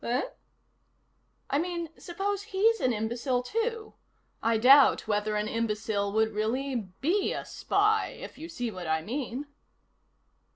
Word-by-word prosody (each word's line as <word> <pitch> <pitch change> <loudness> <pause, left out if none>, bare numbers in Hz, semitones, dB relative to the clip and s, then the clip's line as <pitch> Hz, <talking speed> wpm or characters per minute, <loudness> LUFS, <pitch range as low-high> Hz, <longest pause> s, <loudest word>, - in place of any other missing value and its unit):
"Eh?" 245 +3 0 1.3
"I 280 - +3
mean, 340 -1 -3
suppose 390 +3 -3
he's 435 +2 +2
an 255 - +2
imbecile, 240 +3 -1
too? 455 - -2 0.5
I 230 0 +2
doubt 265 +3 +6
whether 210 0 0
an 210 0 0
imbecile 210 -3 -1
would 220 0 +2
really 230 0 -1
be 365 +8 +1
a - - -5
spy, 425 +2 +1
if - - -9
you 325 +2 -9
see 245 -8 -3
what 180 -4 -7
I 160 0 0
mean." 255 - -4
250 Hz, 135 wpm, -28 LUFS, 220-350 Hz, 1.3 s, doubt